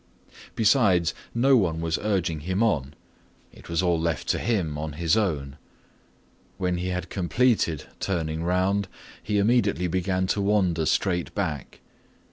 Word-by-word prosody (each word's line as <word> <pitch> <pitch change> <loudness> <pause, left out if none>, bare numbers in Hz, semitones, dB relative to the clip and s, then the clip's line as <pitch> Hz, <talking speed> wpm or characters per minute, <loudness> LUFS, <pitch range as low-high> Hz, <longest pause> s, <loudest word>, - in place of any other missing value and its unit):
Besides, 100 - +3 0.2
no 135 +3 +4
one 85 -8 +1
was 80 -1 -1
urging 95 -6 0
him 95 +7 -1
on. 70 - 0 0.6
It - - -15
was 85 +2 0
all 85 -2 +2
left 80 -5 -2
to - - +1
him 95 -9 -1
on 75 0 -4
his 80 +1 +1
own. 75 -10 -1 1.0
When 90 -2 -1
he 90 +1 -3
had 90 0 -4
completed 95 - +1 0.2
turning 80 -4 -2
around, 95 +3 +1 0.3
he 105 0 -1
immediately 105 -3 +2
began 95 +1 0
to 100 +2 0
wander 95 -6 +1
straight 90 0 0
back. 80 - -4
90 Hz, 140 wpm, -25 LUFS, 80-100 Hz, 1.0 s, no